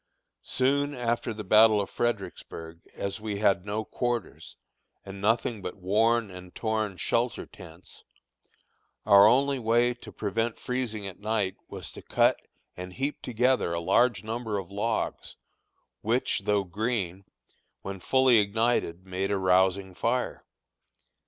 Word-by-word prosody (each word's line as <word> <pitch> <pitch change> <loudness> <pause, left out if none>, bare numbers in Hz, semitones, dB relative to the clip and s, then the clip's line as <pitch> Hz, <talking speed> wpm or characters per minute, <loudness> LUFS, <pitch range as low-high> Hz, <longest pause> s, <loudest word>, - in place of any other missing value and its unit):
Soon 140 +2 +1
after 120 -1 -1
the 105 -1 -6
battle 110 +2 +6
of 100 - -1
Fredericksburg, 95 -7 -4 0.2
as 100 +2 -4
we 105 -2 -3
had 100 -2 +2
no 105 +2 -2
quarters, 120 - -3 0.5
and 95 0 -8
nothing 110 +1 +1
but 90 - -6
worn 110 +3 +2
and 90 0 -11
torn 110 -3 -1
shelter 120 +4 -1
tents, 85 -1 -14 1.0
our 100 -1 +8
only 135 +3 +3
way 120 +1 +2
to 120 - -12
prevent 115 +2 -2
freezing 125 -5 -3
at 95 -2 -8
night 105 -3 -1
was - - -7
to - - -10
cut - - +2 0.4
and 90 0 -8
heap 140 +6 -3
together 125 -5 +1
a - - -1
large 100 +6 +2
number 110 -1 -3
of 95 -1 -6
logs, 110 +3 -2 0.7
which, 115 +4 0
though 105 -1 +2
green, 100 -1 -3 0.6
when 95 0 -6
fully 130 +2 +4
ignited 105 -4 0
made 95 +1 -2
a 100 - +1
rousing 95 0 +2
fire. 120 +7 -1
105 Hz, 135 wpm, -27 LUFS, 95-120 Hz, 1.0 s, our